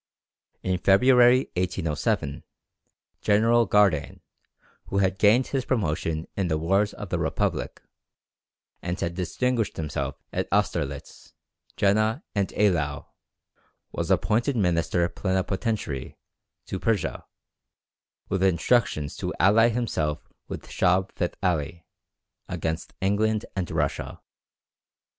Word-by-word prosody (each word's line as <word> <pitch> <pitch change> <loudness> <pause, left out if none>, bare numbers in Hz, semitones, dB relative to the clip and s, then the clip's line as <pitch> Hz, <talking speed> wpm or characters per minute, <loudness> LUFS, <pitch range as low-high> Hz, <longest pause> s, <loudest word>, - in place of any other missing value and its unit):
In 95 -1 0
February, 125 +6 +5
1807, 85 -5 -1 0.8
General 115 +2 +3
Gardane, 95 -9 +2 0.7
who 100 - -2
had 95 -1 +1
gained 115 +5 +5
his 135 -2 -1
promotion 80 - -1
in 95 -2 0
the 80 -2 0
wars 95 +6 +1
of 105 -3 -7
the - - -1
Republic, - - -1 1.0
and 90 +1 -3
had 85 0 -2
distinguished 110 +6 -1
himself 75 -2 -3 0.2
at - - -1
Austerlitz, 85 -8 -2 0.4
Jena, 110 - +2
and 100 -2 +1
Eylau, 80 -9 0 0.8
was - - -3
appointed 120 +6 +2
Minister 85 -2 +1
Plenipotentiary 95 - -2 0.5
to 95 - -4
Persia, 110 -1 -1 1.0
with 95 -2 -1
instructions 95 -4 +1
to - - -3
ally 115 +4 +5
himself 80 -11 -2 0.2
with - - -7
Shah 90 +1 +2
Feth 90 - -2
Ali 85 -2 -1 0.6
against 80 +1 -4
England 105 +2 +1
and 95 -4 -2
Russia. - - -2
95 Hz, 105 wpm, -26 LUFS, 85-110 Hz, 1.0 s, February